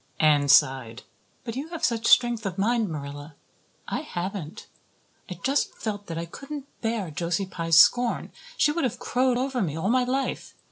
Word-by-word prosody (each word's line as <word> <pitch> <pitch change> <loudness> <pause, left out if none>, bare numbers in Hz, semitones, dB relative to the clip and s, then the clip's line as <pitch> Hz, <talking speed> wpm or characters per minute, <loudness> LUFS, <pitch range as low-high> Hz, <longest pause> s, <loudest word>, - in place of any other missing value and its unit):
Anne 150 -2 +4
sighed. 130 -3 +3 0.4
"But 230 -2 -6
you 275 +4 -4
have 335 -1 -2
such 230 -2 0
strength 240 -2 +4
of 185 - -5
mind, 225 +1 +1
Marilla. 145 0 -7 0.5
I - - -2
haven't. 175 -2 -6 0.6
I 180 - -5
just 275 +3 0
felt 205 -2 -5
that 165 - -5
I 165 - -3
couldn't 275 - -8 0.2
bear 225 -7 -2
Josie 170 +5 -1
Pye's 165 -3 +1
scorn. 240 +8 +4 0.3
She 295 - +3
would 335 +2 -2
have 250 - -1
crowed 255 0 +1
over 260 -1 -1
me 155 -6 -2
all 185 +5 -1
my 255 0 +3
life. 265 +2 -3
205 Hz, 175 wpm, -25 LUFS, 160-250 Hz, 0.6 s, Anne